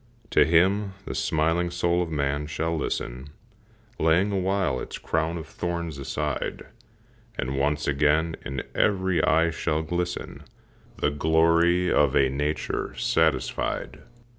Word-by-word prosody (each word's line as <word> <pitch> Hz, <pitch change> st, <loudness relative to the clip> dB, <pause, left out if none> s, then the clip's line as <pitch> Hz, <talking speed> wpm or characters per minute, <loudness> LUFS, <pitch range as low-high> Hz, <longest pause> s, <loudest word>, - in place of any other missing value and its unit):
To -, -, +5 dB
him 95 Hz, +4 st, +2 dB
the -, -, -4 dB
smiling 80 Hz, +5 st, +1 dB
soul 85 Hz, 0 st, +1 dB
of 85 Hz, -, -2 dB
man 70 Hz, -1 st, -1 dB
shall 80 Hz, +2 st, -2 dB
listen, 65 Hz, -3 st, -4 dB, 0.7 s
Laying 85 Hz, +6 st, +3 dB
awhile 95 Hz, -7 st, 0 dB
its -, -, -6 dB
crown 80 Hz, +1 st, -1 dB
of 80 Hz, -, -6 dB
thorns 85 Hz, -2 st, -4 dB
aside, 75 Hz, +1 st, -3 dB, 0.7 s
And 65 Hz, +1 st, -2 dB
once 75 Hz, +2 st, 0 dB
again 75 Hz, +3 st, +2 dB
in 70 Hz, -1 st, -4 dB
every 95 Hz, -4 st, +1 dB
eye 80 Hz, +1 st, +3 dB
shall 80 Hz, -1 st, -1 dB
glisten 90 Hz, +2 st, -3 dB, 0.6 s
The 75 Hz, -, +1 dB
glory 85 Hz, +4 st, +3 dB
of 75 Hz, -3 st, +3 dB
a 65 Hz, -1 st, +4 dB
nature 75 Hz, +3 st, -2 dB
satisfied. 80 Hz, -5 st, 0 dB
80 Hz, 125 wpm, -25 LUFS, 75-85 Hz, 0.7 s, To